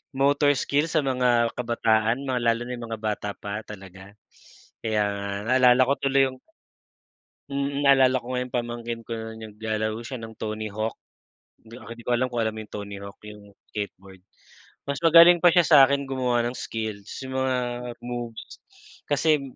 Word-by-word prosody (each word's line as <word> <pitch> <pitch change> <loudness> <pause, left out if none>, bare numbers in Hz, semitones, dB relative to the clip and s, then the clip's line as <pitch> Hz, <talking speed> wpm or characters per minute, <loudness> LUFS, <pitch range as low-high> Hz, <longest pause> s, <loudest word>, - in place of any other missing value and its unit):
motor 140 +2 +3
skill, 145 +4 +1
sa 155 - +2
mga 125 -3 +2
kabataan, 115 +1 +1
mga 130 -2 -1
lalo 115 0 +2
na 125 - -7
'yong 120 -1 -7
mga 110 -1 -5
bata 105 -1 -2
pa 105 +1 -5
talaga. 95 -1 -11 0.7
Kaya 110 -2 +1
nga, 100 0 -3 0.2
naalala 130 0 +5
ko 140 - +3
tuloy 135 0 +3
'yong 130 0 -12 1.1
Mm, 140 0 -2
naalala 135 -2 +4
ko - - -17
nga 125 - -1
'yong 125 - -14
pamangkin 120 -1 -3
ko 115 - -13
na, 110 0 -6 0.2
naglalaro 110 0 -3
siya 125 -1 -6
ng 110 -1 -10
Tony 110 0 -4
Hawk. 110 +2 -3 0.7
'Di, 115 +2 -12
ah, - - -14
'di 115 - -13
ko 125 - -3
alam 125 +1 +2
kung 120 -2 -2
alam 110 - 0
mo 110 - -8
'yong 110 - -11
Tony 100 -1 -6
Hawk, 100 0 -10
'yong 105 -1 -13 0.2
skateboard. 95 -2 -7 0.7
Mas 140 - -2
magaling 170 +1 +8
pa - - +8
siya 175 - +5
sa'kin 140 -2 +6
gumawa 125 -3 0
ng 120 - -5
skills, 110 -2 -5 0.2
'yong 130 0 -6
mga 130 -1 +1 0.5
moves 120 -2 -7 0.5
kasi, 150 0 +2
120 Hz, 175 wpm, -25 LUFS, 110-130 Hz, 1.1 s, magaling